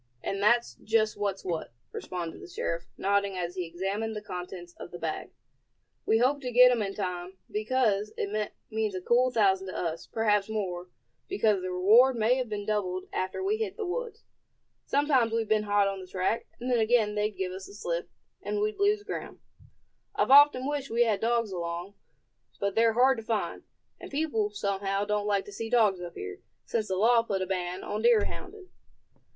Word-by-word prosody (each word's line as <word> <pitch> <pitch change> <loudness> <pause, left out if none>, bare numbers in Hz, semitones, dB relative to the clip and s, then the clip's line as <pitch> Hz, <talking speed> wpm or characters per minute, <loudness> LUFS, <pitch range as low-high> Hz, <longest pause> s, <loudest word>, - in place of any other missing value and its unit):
"And 195 0 -2
that's 235 +3 +3
just 215 0 +2
what's 200 -2 -3
what," 165 -9 -3 0.2
responded 175 -3 -5
the 380 - -9
sheriff, 170 - -3
nodding 200 -1 +1
as 175 -1 -3
he 180 -2 -3
examined 195 +6 -3
the 210 - -4
contents 180 -2 -7
of - - -8
the 175 - -8
bag. 160 -2 -4 0.8
"We 220 - +4
hope 265 +5 +2
to 250 -2 -4
get 250 +1 +8
'em 240 -3 +1
in 195 -1 -3
time, 180 -1 -4
because 215 -2 +1
it 210 +1 -2 0.2
means 215 -2 -1
a 185 - -3
cool 245 +6 +3
thousand 195 -5 +2
to 185 - -5
us, 165 -1 -3
perhaps 210 -2 +1
more, 185 -4 -3 0.4
because 220 - +2
the 185 - -3
reward 220 +9 +5
may 225 +1 +3
have 255 -3 -2
been 205 -1 -4
doubled 190 -4 -2
after 185 - -2
we 415 +3 +1
hit 435 -3 -3
the 440 - -3
woods. 470 +6 -4 0.6
Sometimes 270 -5 +2
we've 225 -1 0
been 215 0 +2
hot 205 -1 +4
on 195 -1 -3
the 185 - -9
track, 190 +5 -1
and 250 +1 -3
then 240 - +3
again 220 -1 +3
they'd 210 0 -1
give 185 -1 -2
us 190 +1 -7
the - - -13
slip, 170 -4 -3 0.3
and 205 0 -2
we'd 215 +1 -1
lose 410 +1 +2
ground. - - -6 0.8
I've 405 -10 +1
often 280 -2 +7
wished 285 -1 -2
we 235 +1 +3
had 215 -4 0
dogs 230 -2 +1
along; 175 +1 -4 0.7
but 200 0 0
they're 225 +1 +4
hard 255 +1 +4
to - - -8
find; 220 -1 -2 0.3
and - - -9
people, 280 -8 0
somehow, 200 -1 -1
don't 210 0 -1
like 200 -1 +1
to - - -10
see 225 +3 -5
dogs 215 -6 +3
up 175 -1 -7
here, 90 0 -7 0.3
since 220 -2 -1
the 190 - -1
law 230 +4 +5
put 200 -4 -2
a - - -2
ban 180 -1 -3
on 210 +1 -3
deer 230 -2 +5
hounding." 385 -1 -8
210 Hz, 195 wpm, -28 LUFS, 190-235 Hz, 0.8 s, get